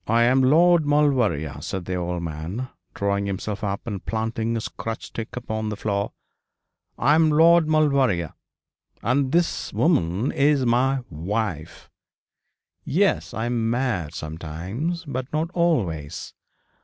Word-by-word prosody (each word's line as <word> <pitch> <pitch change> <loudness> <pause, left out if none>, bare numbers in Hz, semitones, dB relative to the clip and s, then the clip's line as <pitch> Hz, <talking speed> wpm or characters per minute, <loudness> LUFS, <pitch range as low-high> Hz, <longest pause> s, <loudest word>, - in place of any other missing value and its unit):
'I 115 +2 +4
am 130 +3 +4
Lord 165 +5 +5
Maulevrier,' 120 - +1
said 95 +3 -4
the 95 - -3
old 90 -1 -2
man, 85 +10 -5 0.3
drawing 100 0 0
himself 100 +2 -4
up 100 -1 -3
and 100 -5 -5
planting 115 +1 -2
his 115 - -2
crutch 115 0 -6
stick 115 -1 -7
upon 110 -3 -3
the 105 - -3
floor; 100 -1 -1 0.9
'I 140 +4 +3
am 160 0 +4
Lord 165 +2 +5
Maulevrier, 140 - +2 0.7
and 130 +3 +1
this 170 +1 0
woman 105 - +1
is 140 -1 +2
my 130 +2 +2
wife. 85 -1 -4 0.9
Yes, - - +1
I 110 - -2
am 120 -2 0
mad 115 - -1
sometimes, 90 - -4
but 130 -2 -4
not 160 +2 -1
always. 100 - -1
115 Hz, 130 wpm, -24 LUFS, 95-140 Hz, 0.9 s, Lord